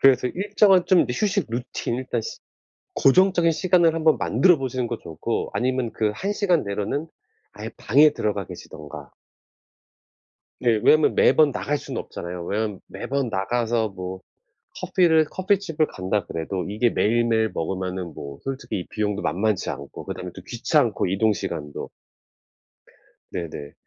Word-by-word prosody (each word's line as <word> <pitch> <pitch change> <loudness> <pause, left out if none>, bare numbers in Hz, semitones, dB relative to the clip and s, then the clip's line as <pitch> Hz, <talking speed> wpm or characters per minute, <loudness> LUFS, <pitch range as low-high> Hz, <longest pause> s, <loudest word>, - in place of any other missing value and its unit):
그래서 130 -2 +5
일정한 195 - +3
좀 185 -2 +5
이 - - -3
휴식 200 - 0
루틴 120 0 -3
일단 125 -2 -2
시 - - -7 0.6
고정적인 175 +3 +4
시간을 170 0 +3
한번 160 -1 +3
만들어 180 -4 +4
보시는 130 -2 -2
것도 120 - -5
좋고 80 +8 -3
아니면 125 -2 0
그 110 -1 0
1 200 - -2
시간 185 -6 +2
내로는 105 +10 -3 0.5
아예 - - -7
방에 145 +7 +5
들어가 105 -3 -2
계시든가. 75 -2 -10 1.5
네 115 -3 +2
왜냐하면 155 0 +5
매번 155 -2 +5
나갈 145 +2 -1
순 135 -3 -7
없잖아요. 85 0 -6
왜냐하면 105 0 -2
매번 140 -2 -3
나가서 115 +2 0
뭐 95 -1 -7 0.6
커피를 160 -3 +3
커피집을 185 -3 0
간다 95 +1 -2
그래도 90 +3 -3
이게 110 +4 +1
매일매일 115 0 +2
먹으면은 90 0 -3
뭐 70 -1 -8
솔직히 135 -7 -4
이 90 - -8
비용도 105 -1 -2
만만치 105 +1 0
않고 70 0 -8
그다음에 - - -6
또 - - -10
귀찮고 - - +1
이동시간도. 95 -7 -1 1.4
네네. 80 -5 -6
120 Hz, 320 characters per minute, -24 LUFS, 100-155 Hz, 1.5 s, 그래서